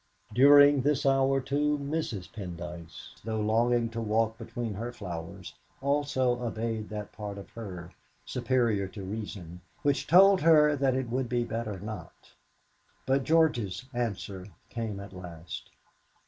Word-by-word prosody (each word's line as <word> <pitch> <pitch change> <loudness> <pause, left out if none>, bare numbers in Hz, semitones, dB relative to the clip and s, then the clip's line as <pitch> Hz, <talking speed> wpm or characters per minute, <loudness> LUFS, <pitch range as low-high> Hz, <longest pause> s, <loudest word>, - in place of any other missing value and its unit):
During 145 +2 +7
this 145 +2 +1
hour, 135 0 +3
too, 145 +3 +1
Mrs. 140 - -3
Pendyce, 85 -4 -8
though 110 0 -2
longing 115 +2 +2
to 115 0 -4
walk 110 0 +1
between 115 -1 -5
her 115 +5 -4
flowers, 85 -8 -7 0.3
also 135 -3 +1
obeyed 115 -2 -3
that 105 -1 -6
part 105 -2 -6
of 100 - -10
her, 90 -6 -8 0.3
superior 120 -5 +1
to 100 +1 -9
reason, 95 -4 -6 0.2
which 145 -1 +1
told 190 +2 +7
her 150 -2 +6
that 135 -2 +1
it 130 -3 -2
would 125 -1 -1
be 120 0 +1
better 115 -4 -4
not. 100 -4 -9 0.7
But 135 +1 +1
George's 130 - +2
answer 100 -5 -3 0.2
came 110 -4 -4
at 100 0 -9
last. 85 -3 -8
115 Hz, 135 wpm, -29 LUFS, 100-135 Hz, 0.7 s, During